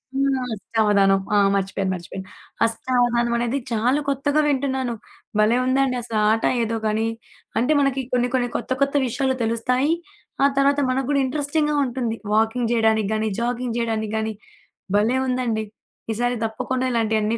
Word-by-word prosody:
హ్మ్, 275 -1 +1
అష్టవధానం. 205 -2 +2 0.2
ఆ! - - +5 0.2
మర్చిపోయాను, 195 -1 -1
మర్చిపోయాను. 185 +1 -7 0.4
అష్టవధానం. 240 +1 +1
అనేది 240 +3 0
చాలా 240 +5 +1
కొత్తగా 280 +2 +1
వింటున్నాను. 265 -3 0 0.5
భలే 215 +3 +4
ఉందండి 260 0 +2
అసల 230 -2 -4
ఆట 225 +1 0 0.2
ఏదో 225 0 -1
గానీ, 220 +1 0 0.5
అంటే 250 +7 +2
మనకి 275 -1 +1
కొన్ని, 245 0 +2
కొన్ని 245 -2 +1
కొత్త, 245 - -7
కొత్త 275 +1 +2
విషయాలు 265 +2 0
తెలుస్తాయి. 250 +6 +1 0.5
ఆ - - +7
తర్వాత 280 +1 +3
మనకు 255 0 0
కూడా 280 -1 +3
ఇంట్రెస్టింగ్‌గా 295 +2 0
ఉంటుంది 240 -3 -2 0.2
వాకింగ్ 225 +2 +1
చేయడానికి 220 -3 +2
గానీ, 220 0 0
జాగింగ్ 240 0 -2
చేయడానికి 220 -2 -1
గాని. 220 0 -2 0.6
భలే 225 +5 +2
ఉందండి. 245 -4 -1 0.5
ఈసారి 245 +2 0
తప్పకుండా 255 +4 -2
ఇలాంటివన్నీ 220 -1 +1
240 Hz, 140 wpm, -22 LUFS, 220-260 Hz, 0.6 s, ఆ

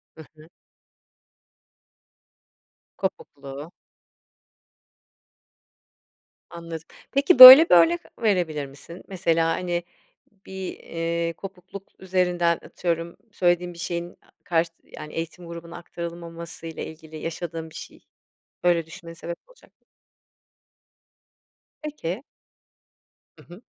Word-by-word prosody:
Hı 160 - -12
hı. 155 - -16 2.5
Kopukluğu. 145 -5 -6 2.8
Anladım. 165 -1 -9 0.2
Peki, 275 -2 +2
böyle 260 +6 +13
bir - - +7
örnek 170 0 +4 0.2
verebilir 175 -9 0
misin? 140 +6 -13
Mesela, 165 -4 0
hani, 175 +1 -2 0.6
bir, 190 -1 -7
eee, 170 0 -3
kopukluk 195 +1 -11
üzerinden 180 -2 +1
atıyorum 170 -1 -4
söylediğin 175 -2 0
bir 170 - -14
şeyin 175 0 -5
a - - -28
karşı 165 -1 0
yani 150 - -11
eğitim 170 +2 -6
grubuna 170 0 -9
aktarılmamasıyla 170 -1 -8
ilgili 160 0 -10
yaşadığın 165 0 -6
bir - - -18
şey - - -11 0.6
böyle 170 -2 +2
düşünmene 165 0 -11
sebep 170 +1 -7
olacak. - - -23 2.1
Peki. 255 - -5 1.1
Hı - - -17
hı. 185 - -14
170 Hz, 95 wpm, -24 LUFS, 165-180 Hz, 2.8 s, böyle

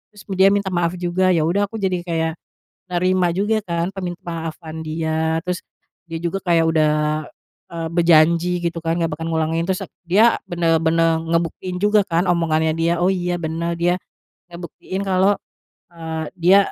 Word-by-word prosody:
terus 205 - -13 0.2
dia 190 - +7
minta 200 -1 +1
maaf 175 0 0
juga, 180 +1 +1
ya 160 - +2
udah 195 +6 +1
aku 225 - -11
jadi 190 -4 -1
kayak, 165 -1 0 0.6
nerima 180 0 +2
juga 205 +4 +1
kan, 170 0 -1
permintamaafan 165 -3 -6
dia. 160 0 -1
Terus, 180 +1 -3 0.5
dia 165 -1 -6
juga 175 +3 -1
kayak 170 -2 +4
udah, 155 -2 +3 0.8
eee, 165 -1 -3
berjanji, 170 +1 +3
gitu 170 0 -2
kan, 165 +1 0
nggak 165 - +1
bakal 160 - -5
ngulangin, 160 +1 0
terus 185 0 -1 0.2
dia 210 +7 +4
benar-benar 165 -1 +2
ngebuktiin 170 +2 -2
juga 210 -1 +3
kan, 175 0 0
omongannya 160 -2 +1
dia, 165 +1 +2
oh 180 - +3
iya 180 -2 -1
benar, 165 +1 -2
dia, 175 +1 +2 0.5
ngebuktiin 175 +3 -6
kalau, 195 +1 +3 0.5
eee, 160 -2 -5
dia, 180 +3 +6
170 Hz, 155 wpm, -21 LUFS, 165-185 Hz, 0.8 s, dia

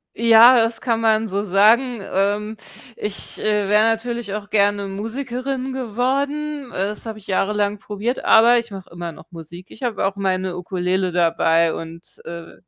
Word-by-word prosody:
Ja, 230 +2 +7
das 225 0 0
kann 230 -2 0
man 220 0 +2
so 200 0 -2
sagen. 220 +4 +3
Ähm, 205 +3 -1 0.4
ich, 210 -1 -6
äh, 210 -2 0
wäre 210 +1 +4
natürlich 225 -1 -1
auch 205 -1 -6
gerne 205 -1 +1
Musikerin 255 +5 -4
geworden. 270 +3 -2
Äh, - - -6
das 210 +2 -7
habe 220 -1 -6
ich 200 - -19
jahrelang 205 +1 0
probiert, 210 +5 -4
aber 235 +2 +6
ich 235 -2 -3
mache 195 -2 -9
immer 170 0 -6
noch - - -14
Musik. 170 +2 -11
Ich 220 - -13
habe 230 -6 -1
auch 195 0 -1
meine 185 -2 -2
Ukulele 180 +1 -2
dabei 165 -1 +2
und, 165 +1 -10
äh, 170 0 -9
210 Hz, 165 wpm, -20 LUFS, 190-235 Hz, 0.4 s, Ja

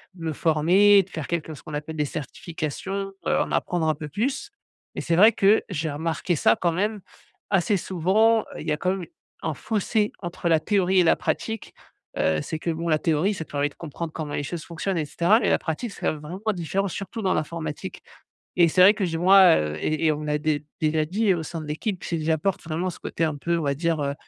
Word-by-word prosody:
de 165 -2 -8
me 160 - -1
former, 180 +7 +5
de 190 - -20
faire 160 -4 -5
quelques 160 -2 -3
ce - - -15
qu'on 155 - -9
appelle 150 +2 -5
des 150 -1 0
certifications, 170 +7 -5
heu, - - +2
en - - -1
apprendre 170 -3 0
un 155 - +2
peu 150 0 -7
plus. 250 - -2 0.4
Mais - - -3
c'est 170 - 0
vrai 210 +6 +7
que 205 0 +3
j'ai 160 -4 -2
remarqué 165 +3 -1
ça 115 -6 +4
quand 175 - +2
même 205 +5 -1 0.5
assez 195 +1 +2
souvent, 195 +6 +2
il - - -8
y - - +1
a 150 - +1
quand 180 +4 0
même 190 -1 -3
u - - -12 0.3
un - - -2
fossé 215 0 -1
entre 175 -1 -3
la 160 -1 +4
théorie 190 0 +2
et - - +6
la - - +5
pratique, 225 0 -3 0.4
heu. 80 -1 +2
C'est 160 - -5
que 170 - -3
bon, 165 +1 -3
la 155 -1 +3
théorie, 165 +6 +1
ça 165 -5 -6
te - - -20
permet 145 0 0
de - - -20
comprendre 165 0 -6
comment 150 -2 -5
les - - -2
choses 160 +2 -5
fonctionnent 175 +3 -3
et 155 - 0
cetera, 175 +9 +3
mais 215 - 0
la - - +4
pratique, 170 +8 -4
c'est - - -2
vraiment 155 +5 -7
différent, 190 +3 -1
surtout 200 +5 -6
dans 190 -2 +1
l'informatique 155 -1 -4 0.6
et 175 -1 +6
c'est 180 +3 +3
vrai 195 +3 +9
que 210 -3 -1
j'ai 165 -2 -2
moi, 185 0 +7
heu, 75 0 -2
et 155 +1 0
et - - +5
on 150 - -5
me 155 - -6
l'a 150 0 +1
dé 150 -1 -1 0.2
déjà 155 0 +2
dit 200 +5 +1
au 170 -2 -3
sein 165 +2 -6
de - - -8
l'équipe, 175 +5 -3
c'est 170 - -2
que - - -4
j'apporte 165 +4 0
vraiment 170 +3 -2
ce 175 - -9
côté 165 - -3
un 155 -2 -2
peu, 170 +4 -1
on 165 - -2
va 140 -1 +1
dire, 165 +1 0
heu, 140 0 -1
170 Hz, 245 wpm, -24 LUFS, 155-195 Hz, 0.6 s, vrai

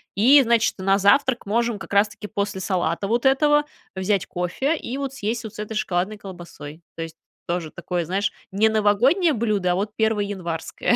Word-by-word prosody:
И, 265 +8 +7
значит, 230 -1 +2
на 195 +1 +2
завтрак 240 +5 +3
можем 230 +1 0
как 195 - -10
раз-таки 205 +1 +1
после 200 -2 -3
салата 180 0 -1
вот 235 +4 0
этого 295 +2 +4 0.3
взять 190 +1 0
кофе 265 - -1
и 260 0 -5
вот 275 -1 -4
съесть 230 -1 -3
вот 220 0 -8
с - - -11
этой 215 +1 -5
шоколадной 195 +1 -1
колбасой. 170 -5 -10
То 165 - -6
есть, 165 0 -7 0.3
тоже 170 -2 -2
такое, 175 0 -3
знаешь, 195 +4 -1 0.2
не 215 +3 +3
новогоднее 240 - +3
блюдо, 210 -6 0
а - - +1
вот 205 +3 -2
перво-январское. 205 -2 -1
205 Hz, 175 wpm, -23 LUFS, 185-235 Hz, 0.3 s, И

